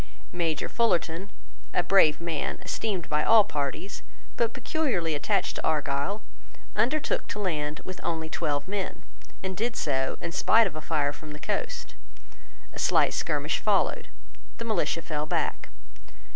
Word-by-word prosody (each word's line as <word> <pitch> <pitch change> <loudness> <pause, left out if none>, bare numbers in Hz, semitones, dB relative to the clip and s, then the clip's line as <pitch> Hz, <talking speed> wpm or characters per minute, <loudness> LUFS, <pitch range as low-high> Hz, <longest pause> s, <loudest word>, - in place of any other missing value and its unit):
Major 165 -4 0
Fullarton, 190 -5 +1 0.5
a 180 - +4
brave 160 -6 +5
man, 165 -3 -2
esteemed 195 -7 -2
by 150 0 +1
all 225 -2 +7
parties, 145 +5 -3 0.3
but 235 -1 +2
peculiarly 240 - 0
attached 145 - 0
to - - -4
Argyle, 155 +6 0 0.5
undertook 260 +8 +1
to - - -4
land 155 -6 -1
with 185 - -6
only 160 -1 -2
twelve 150 -2 -1
men, 195 -1 -3 0.4
and 190 0 -2
did 230 +4 -1
so 135 -3 0
in 170 - -4
spite 220 +5 +5
of 180 -6 -3
a 155 - -4
fire 145 -3 +1
from 150 0 -9
the 150 - -8
coast. - - -3 0.8
A - - -7
slight - - +4
skirmish - - 0
followed. - - +2 0.5
The 230 - -5
militia 180 -6 0
fell 150 -1 -2
back. - - -1
170 Hz, 145 wpm, -28 LUFS, 150-210 Hz, 0.8 s, all